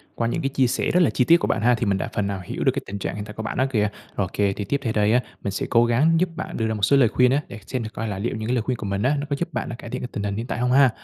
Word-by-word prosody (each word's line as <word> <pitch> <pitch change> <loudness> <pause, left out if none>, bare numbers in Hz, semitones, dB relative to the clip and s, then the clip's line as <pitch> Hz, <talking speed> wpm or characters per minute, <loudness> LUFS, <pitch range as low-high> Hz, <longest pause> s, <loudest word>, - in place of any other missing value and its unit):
qua 115 - 0
những 120 - -1
cái 135 - 0
chia 135 -2 +2
sẻ - - 0
rất 180 - +3
là 170 - +4
chi 125 - +2
tiết 170 +6 +7
của - - -2
bạn - - 0
ha, 125 +1 +4
thì 115 0 -2
mình 100 -1 +1
đã - - -3
phần 105 -2 0
nào 100 -2 -3
hiểu - - -4
được 130 - +4
cái 135 +1 -3
tình 100 +1 -6
trạng - - -3
hiện 105 0 -5
tại 105 - -9
của 110 - -6
bạn - - -4
á 130 - +3
kìa. 105 -4 +2 0.3
Ô - - 0
kê, 100 -1 +1
thì 105 - -5
tiếp 140 +5 0
theo 115 -2 -1
đây 105 0 +3
á, 125 - +5 0.2
mình 100 - -1
sẽ 95 - -2
cố 120 0 +5
gắng 135 +8 +3
giúp 180 0 +1
bạn 190 - -5
đưa 110 -1 0
ra 110 - -1
một 105 - -5
số 140 +8 +5
lời 120 -5 +5
khuyên 125 +2 +3
á, 145 +2 +2
để 115 - -9
xem 130 -3 -2
thử 110 - -5
coi 115 - -3
là 100 -3 -4
liệu 110 +1 -2
những 110 0 -4
cái 125 - +1
lời 120 - +1
khuyên 125 +2 -2
của 105 - -6
mình 100 0 -2
á 135 +4 +3
nó 145 - -3
có 140 - +1
giúp 170 -1 -3
bạn 120 - -3
là 120 - -5
cải 115 - -10
thiện - - -4
cái - - -3
tình 100 - -4
hình 100 -1 -2
hiện 115 +3 -4
tại - - -3
hông 125 0 +1
ha. 135 0 +6
115 Hz, 410 wpm, -23 LUFS, 105-130 Hz, 0.3 s, tiết